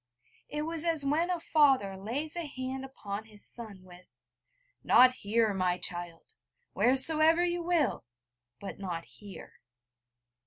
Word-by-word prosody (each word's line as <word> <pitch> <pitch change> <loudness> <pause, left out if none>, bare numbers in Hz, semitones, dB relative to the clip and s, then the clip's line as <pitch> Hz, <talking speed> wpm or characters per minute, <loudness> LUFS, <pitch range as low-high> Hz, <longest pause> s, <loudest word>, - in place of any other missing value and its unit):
It 300 0 -3
was 325 0 -2
as 325 -4 +1
when 315 +5 +1
a 355 -1 -1
father 270 -12 +3
lays 255 - -4
a 340 -3 -4
hand 260 -1 -5
upon 215 -6 -7
his 210 -2 -14
son, 215 -6 -7
with: 180 0 -15 0.8
'Not 255 0 +6
here, 220 -2 0
my 180 -2 0
child; 175 - -4 0.4
wheresoever 315 +6 +3
you 350 0 -1
will 335 - 0 0.5
but 200 - -8
not 175 -4 -5
here.' 200 -2 -13
255 Hz, 130 wpm, -30 LUFS, 200-310 Hz, 0.8 s, Not